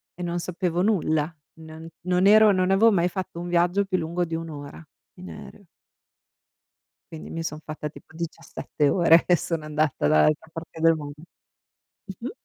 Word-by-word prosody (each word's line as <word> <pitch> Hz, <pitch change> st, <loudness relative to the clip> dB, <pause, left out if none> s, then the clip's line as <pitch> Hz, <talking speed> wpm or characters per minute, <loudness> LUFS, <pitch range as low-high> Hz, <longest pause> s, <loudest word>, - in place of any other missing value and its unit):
E 180 Hz, -, -7 dB
non 175 Hz, 0 st, -2 dB
sapevo 175 Hz, 0 st, -2 dB
nulla, 165 Hz, -6 st, +1 dB, 0.3 s
n 160 Hz, +1 st, -11 dB, 0.2 s
non 180 Hz, +1 st, +2 dB
ero 215 Hz, 0 st, +7 dB
non 185 Hz, 0 st, +1 dB
avevo 220 Hz, +4 st, +5 dB
mai 175 Hz, -2 st, +2 dB
fatto 185 Hz, -2 st, -6 dB
un 175 Hz, -, -5 dB
viaggio 175 Hz, +3 st, +2 dB
più 185 Hz, -1 st, -1 dB
lungo 170 Hz, +1 st, -2 dB
di 165 Hz, 0 st, -4 dB
1 165 Hz, 0 st, -5 dB
ora 145 Hz, +1 st, -9 dB, 0.3 s
in 185 Hz, -, -10 dB
aereo. 200 Hz, -, -12 dB, 1.5 s
Quindi 160 Hz, -, -9 dB
mi 165 Hz, -, -4 dB
son 155 Hz, -1 st, -5 dB
fatta 150 Hz, 0 st, -5 dB
tipo 160 Hz, -, -16 dB
17 160 Hz, -3 st, -3 dB
ore 170 Hz, -2 st, +5 dB
e 180 Hz, -, +4 dB
sono 165 Hz, -1 st, -2 dB
andata 150 Hz, -, -1 dB
dall'altra 150 Hz, -, +2 dB
parte 165 Hz, 0 st, -9 dB
del 165 Hz, 0 st, +5 dB
mondo, 145 Hz, -2 st, -7 dB, 0.9 s
mh-mh. 210 Hz, +5 st, -7 dB
170 Hz, 170 wpm, -24 LUFS, 155-180 Hz, 1.5 s, ero